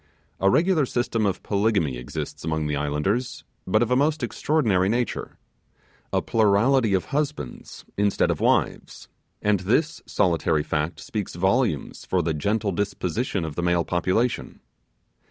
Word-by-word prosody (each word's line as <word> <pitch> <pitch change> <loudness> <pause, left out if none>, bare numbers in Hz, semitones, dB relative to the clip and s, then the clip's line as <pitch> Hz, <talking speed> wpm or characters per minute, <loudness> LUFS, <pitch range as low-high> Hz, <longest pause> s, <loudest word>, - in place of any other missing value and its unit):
A 95 - +4
regular 160 - +3
system 120 -3 0
of 95 - -2
polygamy 100 - +1
exists - - -6
among 80 -1 -1
the 75 -1 -1
islanders; 75 - -1 0.2
but 110 +5 +3
of 120 - -3
a - - +4
most 145 +2 +1
extraordinary 110 -8 +1
nature, 120 +2 -2 0.7
a - - +1
plurality 110 +1 +3
of 95 - -1
husbands, 145 - -4
instead 100 0 +2
of - - -3
wives! - - 0 0.3
and 105 -2 +3
this 125 - 0
solitary 80 -4 +1
fact 75 +3 -2
speaks 105 -6 -5
volumes 95 - 0
for 90 -2 0
the 80 0 0
gentle 100 +7 0
disposition 95 +1 -2
of 80 - -5
the 85 - -3
male 85 -1 +1
population. 95 +8 -1
100 Hz, 140 wpm, -24 LUFS, 85-120 Hz, 0.7 s, A